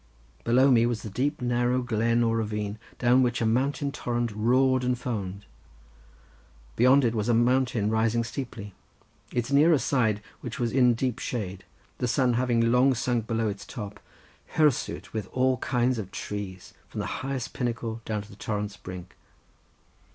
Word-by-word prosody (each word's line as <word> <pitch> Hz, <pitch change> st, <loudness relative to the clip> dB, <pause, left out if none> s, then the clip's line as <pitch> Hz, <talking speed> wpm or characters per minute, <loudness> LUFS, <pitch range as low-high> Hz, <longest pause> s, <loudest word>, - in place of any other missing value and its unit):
Below 130 Hz, +4 st, +5 dB
me 120 Hz, -1 st, +5 dB
was 120 Hz, -2 st, -2 dB
the 110 Hz, -, -6 dB
deep 135 Hz, +5 st, -1 dB
narrow 120 Hz, +1 st, +1 dB
glen 115 Hz, 0 st, +1 dB
or 115 Hz, 0 st, +1 dB
ravine 105 Hz, -1 st, -3 dB, 0.2 s
down 125 Hz, +1 st, +4 dB
which 120 Hz, -2 st, +1 dB
a 115 Hz, -, 0 dB
mountain 140 Hz, +5 st, +1 dB
torrent 120 Hz, -3 st, -2 dB
roared 130 Hz, +4 st, +2 dB
and 125 Hz, 0 st, +1 dB
foamed. 100 Hz, -5 st, -4 dB, 1.3 s
Beyond 130 Hz, +3 st, +5 dB
it 115 Hz, -, +1 dB
was 110 Hz, 0 st, -1 dB
a 120 Hz, -, +4 dB
mountain 120 Hz, -2 st, +2 dB
rising 110 Hz, +1 st, +2 dB
steeply, 115 Hz, -5 st, -6 dB, 0.6 s
its 120 Hz, +2 st, -2 dB
nearer 155 Hz, +3 st, +5 dB
side, 110 Hz, -7 st, +1 dB, 0.2 s
which 125 Hz, +2 st, -7 dB
was 120 Hz, -2 st, 0 dB
in 125 Hz, -2 st, +4 dB
deep 125 Hz, 0 st, -1 dB
shade, 100 Hz, -8 st, -4 dB, 0.3 s
the 125 Hz, -, 0 dB
sun 125 Hz, 0 st, +2 dB
having 115 Hz, -1 st, +2 dB
long 130 Hz, +2 st, +4 dB
sunk 120 Hz, -2 st, -1 dB
below 115 Hz, -1 st, 0 dB
its 100 Hz, -1 st, -4 dB
top, 105 Hz, -4 st, -7 dB, 0.6 s
hirsute 150 Hz, -5 st, +1 dB
with 110 Hz, -4 st, -3 dB
all 130 Hz, 0 st, +2 dB
kinds 125 Hz, 0 st, 0 dB
of 95 Hz, -4 st, -5 dB
trees, 100 Hz, -3 st, -6 dB
from -, -, -7 dB
the -, -, -2 dB, 0.2 s
highest 130 Hz, -2 st, -4 dB
pinnacle 115 Hz, -2 st, -3 dB
down 105 Hz, -2 st, -3 dB
to 105 Hz, -, -16 dB
the -, -, -12 dB
torrent's 105 Hz, 0 st, -4 dB
brink. 90 Hz, -2 st, -9 dB
120 Hz, 165 wpm, -27 LUFS, 110-125 Hz, 1.3 s, Below